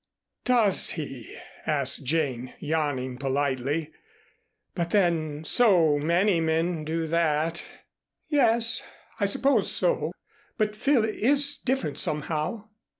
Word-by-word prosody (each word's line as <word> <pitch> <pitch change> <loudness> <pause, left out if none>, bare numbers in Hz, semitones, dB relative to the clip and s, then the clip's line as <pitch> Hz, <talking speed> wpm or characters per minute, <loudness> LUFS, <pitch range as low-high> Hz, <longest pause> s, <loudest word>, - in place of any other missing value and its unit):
"Does 230 -6 +3
he?" 135 -7 -7 0.3
asked 140 -2 +1
Jane, 130 -4 -2
yawning 145 -5 -2
politely. 140 +3 -1 0.8
"But 170 -2 -2
then 160 -6 0
so 165 -7 +4
many 170 +4 +2
men 160 0 0
do 160 +1 -2
that." 165 0 0 0.7
"Yes 235 -5 +2 0.4
I 200 - +2
suppose 275 +8 +2
so, - - 0 0.5
but 215 -2 0
Phil 250 0 +2
is 280 +6 +2
different 260 - -2
somehow." 155 +8 -2
165 Hz, 100 wpm, -26 LUFS, 150-215 Hz, 0.8 s, so